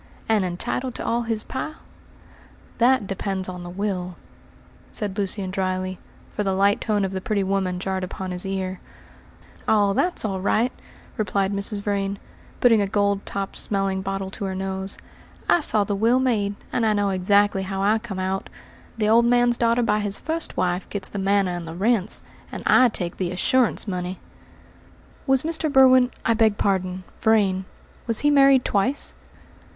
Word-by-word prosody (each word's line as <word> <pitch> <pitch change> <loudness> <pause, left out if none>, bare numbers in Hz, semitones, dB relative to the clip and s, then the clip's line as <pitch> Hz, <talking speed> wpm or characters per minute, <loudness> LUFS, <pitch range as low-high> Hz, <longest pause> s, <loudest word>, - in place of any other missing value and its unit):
"And 220 -3 +2
entitled 240 +8 -3
to - - -5
all 235 +1 +1
his 225 -2 -2
pile?" 290 +4 -5 1.0
"That 245 -2 +4
depends 195 -1 -3
on 180 -1 -6
the 175 - -7
will," 180 -1 -3 0.7
said 205 -3 -4
Lucian 195 -2 -2
dryly, 185 -1 -2 0.3
for 210 - -2
the 195 -1 0
light 200 +1 +3
tone 210 -3 +1
of 190 - -3
the 190 -1 -4
pretty 200 0 0
woman 190 -2 -1
jarred 190 0 -2
upon 185 0 -5
his 180 0 -2
ear. 190 -1 -3 0.9
"Oh, 205 -2 +3
that's 355 - 0
all 190 -3 -2
right," 225 +5 +2 0.5
replied 200 -1 0
Mrs. 200 +1 -2
Vrain, 200 -1 -1 0.4
putting 230 -4 +5
a 200 - 0
gold 200 0 0
topped 195 -1 -4
smelling 195 -1 0
bottle 195 0 -4
to 200 - -5
her 190 -1 -3
nose. 190 0 -4 0.5
"I - - +5
saw 215 -9 +2
the 205 - -2
will 230 +5 +3
made, 215 -6 0 0.2
and - - +1 0.2
know 200 -1 +1
exactly 200 +1 +2
how 195 0 -3
I 215 +2 +3
come 215 -4 -7
out. 190 +1 -2 0.5
The 215 -2 +1
old 230 +2 +5
man's 245 0 +3
daughter 235 +1 +2
by 210 -2 +2
his 205 -1 -1
first 320 +1 -3
wife 180 0 -1
gets 200 -2 -2
the 200 - -4
manor 195 -2 +1
and 170 -1 -6
the 165 - -7
rents, 210 +1 0 0.3
and - - -6
I 255 -1 +6
take 175 -6 -4
the 185 -2 -1
assurance 230 +7 +2
money!" 180 -1 -4 1.1
"Was 270 -1 +3
Mr. 320 -1 -1
Berwin 260 -2 +6 0.2
I 230 - +4
beg 220 -2 +3
pardon, 185 -2 -1 0.2
Vrain 200 -4 +2 0.4
was 230 -2 +3
he 295 - +3
married 275 -2 +5
twice?" 230 +8 0
200 Hz, 170 wpm, -23 LUFS, 190-225 Hz, 1.1 s, I